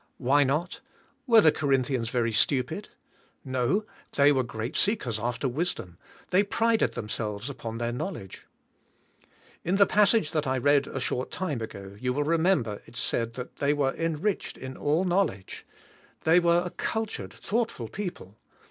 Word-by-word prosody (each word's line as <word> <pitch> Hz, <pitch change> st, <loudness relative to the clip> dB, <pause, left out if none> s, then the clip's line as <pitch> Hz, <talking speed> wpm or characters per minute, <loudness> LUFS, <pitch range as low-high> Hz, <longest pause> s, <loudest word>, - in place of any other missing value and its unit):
Why 140 Hz, +3 st, +4 dB
not? 150 Hz, +7 st, -1 dB, 0.5 s
Were 230 Hz, -3 st, +8 dB
the 155 Hz, -, +6 dB
Corinthians 130 Hz, -5 st, 0 dB
very 115 Hz, -2 st, 0 dB
stupid? 135 Hz, -, +1 dB, 0.6 s
No, 130 Hz, -, 0 dB, 0.3 s
they 140 Hz, 0 st, +5 dB
were 135 Hz, -2 st, +3 dB
great 115 Hz, -1 st, -5 dB
seekers 130 Hz, -, +1 dB
after 120 Hz, +4 st, -1 dB
wisdom, 125 Hz, -, -3 dB, 0.3 s
they 190 Hz, +2 st, +5 dB
prided 225 Hz, +2 st, +1 dB
themselves 105 Hz, +2 st, -4 dB
upon 115 Hz, -4 st, -6 dB
their 120 Hz, 0 st, -1 dB
knowledge. 120 Hz, -, -6 dB, 1.2 s
In 180 Hz, +3 st, +1 dB
the 200 Hz, 0 st, +6 dB
passage 210 Hz, -4 st, +3 dB
that 155 Hz, -3 st, -1 dB
I 130 Hz, 0 st, +1 dB
read 140 Hz, +2 st, +3 dB
a 135 Hz, -, -4 dB
short 130 Hz, 0 st, -2 dB
time 160 Hz, -10 st, -3 dB
ago 100 Hz, -3 st, -7 dB
you 125 Hz, +1 st, -1 dB
will 145 Hz, +3 st, 0 dB
re 165 Hz, +3 st, +2 dB
member 140 Hz, -, +1 dB
it -, -, -15 dB
said 115 Hz, -1 st, -1 dB, 0.3 s
they 145 Hz, +1 st, +2 dB
were 140 Hz, -2 st, +1 dB
"enriched 165 Hz, +5 st, -2 dB
in 130 Hz, 0 st, -7 dB
all 150 Hz, +5 st, +1 dB
know 185 Hz, +2 st, +3 dB
ledge." 95 Hz, -, -9 dB, 0.6 s
The}^ 165 Hz, +2 st, +6 dB
were 170 Hz, 0 st, +3 dB
a 180 Hz, -, -4 dB
cultured, 220 Hz, +4 st, -3 dB
thoughtful 220 Hz, -, -2 dB
people. 140 Hz, -, -7 dB
140 Hz, 155 wpm, -27 LUFS, 120-180 Hz, 1.2 s, Were